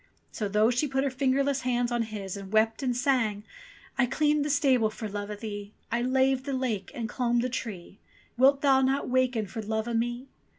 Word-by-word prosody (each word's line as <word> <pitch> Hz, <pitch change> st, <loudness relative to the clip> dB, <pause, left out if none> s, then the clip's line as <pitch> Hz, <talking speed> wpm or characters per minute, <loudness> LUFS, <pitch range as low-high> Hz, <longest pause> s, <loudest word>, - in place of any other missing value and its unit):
So, 210 Hz, -, -3 dB
though 210 Hz, +3 st, +3 dB
she 250 Hz, +5 st, 0 dB
put 270 Hz, 0 st, 0 dB
her 275 Hz, -, 0 dB
fingerless 275 Hz, +1 st, +1 dB
hands 245 Hz, -1 st, 0 dB
on 240 Hz, -1 st, +1 dB
his 210 Hz, -4 st, -5 dB
and 195 Hz, -1 st, -8 dB
wept 220 Hz, +2 st, +2 dB
and 250 Hz, -3 st, 0 dB
sang: 245 Hz, -6 st, +1 dB, 0.6 s
"I 255 Hz, -, +4 dB
cleaned 300 Hz, +3 st, +2 dB
the 295 Hz, -, -2 dB
stable 265 Hz, -6 st, +3 dB
for 220 Hz, 0 st, -6 dB
love 205 Hz, 0 st, -5 dB
o' 210 Hz, -, -4 dB
thee, 205 Hz, -1 st, -7 dB, 0.2 s
I 235 Hz, +1 st, +1 dB
laved 260 Hz, +1 st, +2 dB
the 275 Hz, -, -3 dB
lake 240 Hz, -7 st, -2 dB
and 230 Hz, -2 st, -3 dB
I -, -, -11 dB
clomb 240 Hz, -1 st, +1 dB
the 255 Hz, -, -1 dB
tree, 200 Hz, -7 st, -6 dB, 0.4 s
Wilt 270 Hz, +3 st, +4 dB
thou 270 Hz, -2 st, +4 dB
not 270 Hz, +2 st, +1 dB
waken 255 Hz, -3 st, +1 dB
for 210 Hz, +3 st, -6 dB
love 220 Hz, +1 st, -2 dB
o' 235 Hz, -, -2 dB
me 240 Hz, +3 st, -1 dB
240 Hz, 215 wpm, -28 LUFS, 220-265 Hz, 0.6 s, I